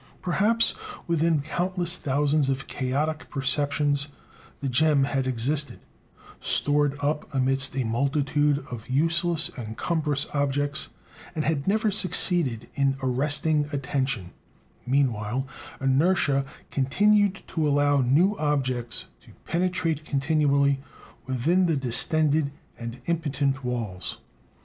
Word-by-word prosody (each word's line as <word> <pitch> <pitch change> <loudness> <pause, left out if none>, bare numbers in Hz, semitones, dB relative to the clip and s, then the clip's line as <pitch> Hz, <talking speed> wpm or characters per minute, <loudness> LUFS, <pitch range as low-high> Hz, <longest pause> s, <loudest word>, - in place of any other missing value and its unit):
Perhaps 210 +6 +2 0.3
within 165 -2 +1
countless 175 +3 -1
thousands 145 -1 +1
of 135 0 -2
chaotic 150 +4 -2
perceptions 145 +1 0 0.5
the 140 - -3
gem 140 +2 +3
had 135 -1 -1
existed, 135 +4 -1 0.6
stored 145 -1 +1
up 150 +1 -2
amidst 135 +1 +1
a 135 - 0
multitude 140 +4 +1
of 115 -1 -7
useless 165 +4 +2
and 110 -3 -7
cumbrous 150 -4 0
objects, 145 +1 0 0.5
and 155 - -1
had 150 -1 -1
never 215 +1 +2
succeeded 175 - +1
in 135 -1 +1
arresting 145 +3 +2
attention; 130 - -2 0.6
meanwhile 125 -2 0 0.3
inertia 140 0 +2 0.3
continued 195 +8 +2
to 160 -3 -1
allow 145 -1 +3
new 160 +12 +3
objects 130 -6 -1
to - - -18
penetrate 170 -3 -1
continually 140 -1 +2 0.5
within 160 +9 +2
the 160 -3 +1
distended 145 +4 +2 0.3
and 120 +1 -7
impotent 140 -5 -1
walls. 115 -7 -4
145 Hz, 105 wpm, -26 LUFS, 135-160 Hz, 0.6 s, gem